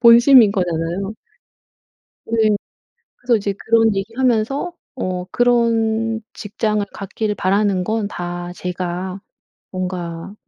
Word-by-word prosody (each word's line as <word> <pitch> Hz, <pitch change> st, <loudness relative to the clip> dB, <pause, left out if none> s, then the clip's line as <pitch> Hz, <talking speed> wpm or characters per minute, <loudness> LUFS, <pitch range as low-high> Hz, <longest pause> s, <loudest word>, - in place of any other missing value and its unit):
본심인 235 Hz, -2 st, +7 dB
거잖아요. 180 Hz, +1 st, -2 dB, 1.1 s
네. 225 Hz, -1 st, +2 dB, 0.7 s
그래서 245 Hz, -2 st, +2 dB
이제 200 Hz, -1 st, -2 dB
그런 225 Hz, -1 st, +3 dB
얘기하면서 235 Hz, -, 0 dB, 0.2 s
어 185 Hz, -6 st, -3 dB
"그런 225 Hz, -2 st, +2 dB
직장을 210 Hz, 0 st, -1 dB
갖기를 210 Hz, +2 st, -3 dB
바라는 195 Hz, -1 st, +1 dB
건 215 Hz, -1 st, -1 dB
다 175 Hz, -1 st, -5 dB
제가 180 Hz, +1 st, -4 dB, 0.5 s
뭔가 180 Hz, 0 st, -5 dB
210 Hz, 220 characters per minute, -20 LUFS, 185-225 Hz, 1.1 s, 본심인